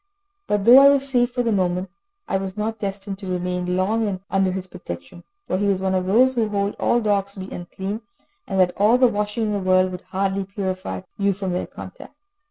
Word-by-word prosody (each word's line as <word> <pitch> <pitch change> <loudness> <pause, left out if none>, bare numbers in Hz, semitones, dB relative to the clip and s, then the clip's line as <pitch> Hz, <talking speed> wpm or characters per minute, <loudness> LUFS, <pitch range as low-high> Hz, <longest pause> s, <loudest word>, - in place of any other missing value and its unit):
But 205 -1 0
though 245 +3 +10
I 280 0 +8
was 275 -1 +3
safe 245 -2 +2
for 245 0 -1
the 230 - +1
moment, 185 -2 0 0.4
I 195 - 0
was 190 +1 -5
not 220 +1 -2
destined 195 -1 -4
to 195 -2 -7
remain 180 0 -1
long 205 0 0
under 195 -1 +2
his 185 0 -4
protection, 175 - -9 0.2
for - - -1
he 205 - +1
was 195 -2 +2
one 190 0 0
of 185 -1 0
those 250 +7 +4
who 230 -4 0
hold 200 0 -1
all 240 - +2
dogs 200 -2 0
to 190 - -7
be 190 - -8
unclean, 190 +5 -5 0.5
and 195 -1 -1
that 180 -1 +4
all 215 +5 +5
the 255 - +5
washing 210 0 -1
in 210 - -1
the 205 - 0
world 185 0 +3
will 180 0 -6
hardly 195 0 -1
purify 185 - -4 0.2
you 200 0 +2
from 190 -1 -4
their 180 - -2
contact. - - -11
195 Hz, 220 wpm, -22 LUFS, 185-210 Hz, 0.5 s, though